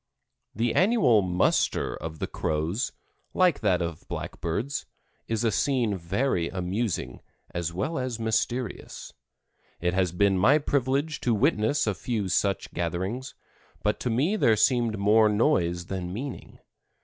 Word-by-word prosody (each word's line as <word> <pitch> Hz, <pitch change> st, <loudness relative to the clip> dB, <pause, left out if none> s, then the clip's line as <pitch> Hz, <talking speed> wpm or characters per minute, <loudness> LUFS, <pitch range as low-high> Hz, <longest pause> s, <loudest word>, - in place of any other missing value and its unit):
The 115 Hz, +2 st, 0 dB
annual 185 Hz, -, +4 dB
"muster" 90 Hz, -1 st, +1 dB
of 80 Hz, 0 st, -7 dB
the -, -, -2 dB
Crows, 80 Hz, -, -2 dB, 0.4 s
like 180 Hz, -5 st, +3 dB
that 90 Hz, -5 st, +2 dB
of 85 Hz, -2 st, -6 dB
blackbirds, 110 Hz, +12 st, -3 dB, 0.4 s
is 115 Hz, 0 st, -1 dB
a 115 Hz, -, +2 dB
scene 120 Hz, 0 st, +1 dB
very 85 Hz, +1 st, -1 dB
amusing, 95 Hz, +3 st, -3 dB, 0.3 s
as 85 Hz, -1 st, -2 dB
well 130 Hz, -, -2 dB
as 125 Hz, -3 st, -3 dB
mysterious. 115 Hz, +1 st, -2 dB, 0.7 s
It 90 Hz, +1 st, 0 dB
has 95 Hz, -2 st, +1 dB
been 95 Hz, +1 st, +2 dB
my 130 Hz, +10 st, +5 dB
privilege 140 Hz, +1 st, 0 dB
to 120 Hz, -2 st, +2 dB
witness 110 Hz, +6 st, +2 dB
a 105 Hz, -, +1 dB
few 105 Hz, -1 st, -3 dB
such 95 Hz, +1 st, 0 dB
gatherings, 95 Hz, +10 st, -3 dB, 0.5 s
but 105 Hz, 0 st, +1 dB
to 125 Hz, -, -2 dB
me 140 Hz, -, +1 dB
there 115 Hz, -, +4 dB
seemed 120 Hz, -1 st, +2 dB
more 105 Hz, +2 st, +4 dB
noise 90 Hz, -, +1 dB
than 90 Hz, -1 st, -4 dB
meaning. 125 Hz, +7 st, -6 dB
105 Hz, 135 wpm, -27 LUFS, 90-125 Hz, 0.7 s, my